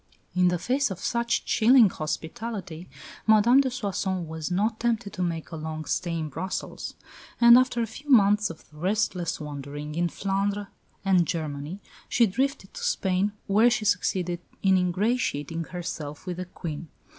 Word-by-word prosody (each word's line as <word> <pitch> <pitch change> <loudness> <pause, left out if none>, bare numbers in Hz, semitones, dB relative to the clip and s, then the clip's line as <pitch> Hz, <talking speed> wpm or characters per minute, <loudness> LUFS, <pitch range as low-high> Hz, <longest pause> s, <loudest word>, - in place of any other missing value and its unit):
In 180 0 +4
the 180 0 +2
face 260 +9 +1
of 190 - -5
such 235 +3 0
chilling 235 0 +6
hospitality 175 +2 -5 0.4
Madame 220 +5 +6
de 265 - 0
Soissons 195 -7 -2
was 160 -1 -5
not 215 +5 0
tempted 230 -3 -1
to 185 - -4
make 170 -2 -2
a - - -5
long 155 0 -5
stay 170 +1 -1
in 160 -1 -2
Brussels; 165 +6 -5 0.4
and 235 0 +9
after 250 -1 +3
a - - 0
few 275 +7 -11
months 210 -4 +5
of 165 - -10
restless 180 0 -1
wandering 145 0 -6
in 170 +2 0
Flanders 200 +3 -1 0.4
and 185 -4 +4
Germany, 155 +3 -4 0.3
she 235 - +4
drifted 255 0 -2
to - - -8
Spain 190 +2 +1
where 215 +5 +5
she 235 -2 -1
succeeded 180 -4 0 0.2
in 190 -1 +5
ingratiating 180 - 0
herself 155 -4 -6
with 180 -2 -4
the 185 - -4
Queen. 165 -3 -6
185 Hz, 155 wpm, -26 LUFS, 165-220 Hz, 0.4 s, and